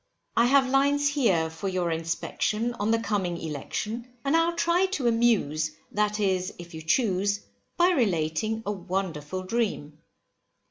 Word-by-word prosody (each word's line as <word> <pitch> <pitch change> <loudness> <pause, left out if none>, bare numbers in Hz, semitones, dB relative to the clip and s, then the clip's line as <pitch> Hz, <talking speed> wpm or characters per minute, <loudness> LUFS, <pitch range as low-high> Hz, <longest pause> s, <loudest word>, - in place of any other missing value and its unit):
I 235 +1 +5
have 270 0 +4
lines 280 +2 +3
here 220 - +2
for 165 +5 -5
your 180 -2 -1
inspection, 175 +8 -1
on 205 +1 0
the 230 - +4
coming 200 -6 -1
election, 215 - -4
and 275 +3 +2
I'll 335 +1 +2
try 345 +2 +2
to 310 -9 -3
amuse, 195 -10 +2 0.2
that 210 0 0
is 190 -2 +1
if 175 0 -11
you 160 - -7
choose, 200 +3 +1 0.4
by 355 +1 +5
relating 215 - 0
a 205 - -1
wonderful 185 -3 -3
dream. 185 -8 -2
205 Hz, 145 wpm, -27 LUFS, 175-240 Hz, 0.4 s, I